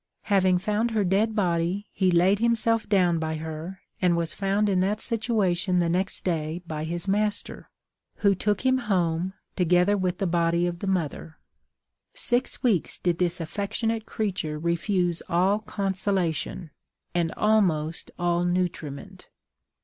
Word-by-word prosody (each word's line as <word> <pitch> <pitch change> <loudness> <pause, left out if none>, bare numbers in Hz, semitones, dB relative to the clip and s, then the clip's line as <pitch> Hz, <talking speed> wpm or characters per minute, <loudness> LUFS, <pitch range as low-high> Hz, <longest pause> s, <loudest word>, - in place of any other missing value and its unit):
Having 190 -3 +3
found 210 +5 0
her 220 -2 +1
dead 205 +4 +1
body, 180 0 0
he 190 -2 +1
laid 180 +3 +4
himself 230 -1 +1
down 180 -5 +3
by 160 0 -2
her, 160 +4 -6 0.2
and 175 -2 +3
was 165 -1 -1
found 200 +1 +1
in 190 -2 +2
that 200 +3 +1
situation 205 -6 0
the 170 -1 +2
next 185 +3 -1
day 165 -1 -2
by 155 -2 -4
his 170 +3 -4
master, 210 +1 -1 0.5
who 200 -1 +3
took 205 +2 0
him 260 0 +4
home, 180 -5 0 0.2
together 180 +2 +3
with 185 -2 -1
the 195 - -1
body 170 0 +2
of 175 -1 -3
the 200 - -4
mother. 165 -3 -2 0.8
Six 245 +1 -1
weeks 215 - +1
did 175 -2 -1
this 180 -1 0
affectionate 215 +6 -2
creature 185 -8 -2
refuse 170 +2 0
all 185 +4 +3
consolation, 190 -5 -2 0.4
and 170 -2 +1
almost 175 -7 +1
all 175 0 +1
nutriment. 175 -5 -3
185 Hz, 140 wpm, -26 LUFS, 170-205 Hz, 0.8 s, laid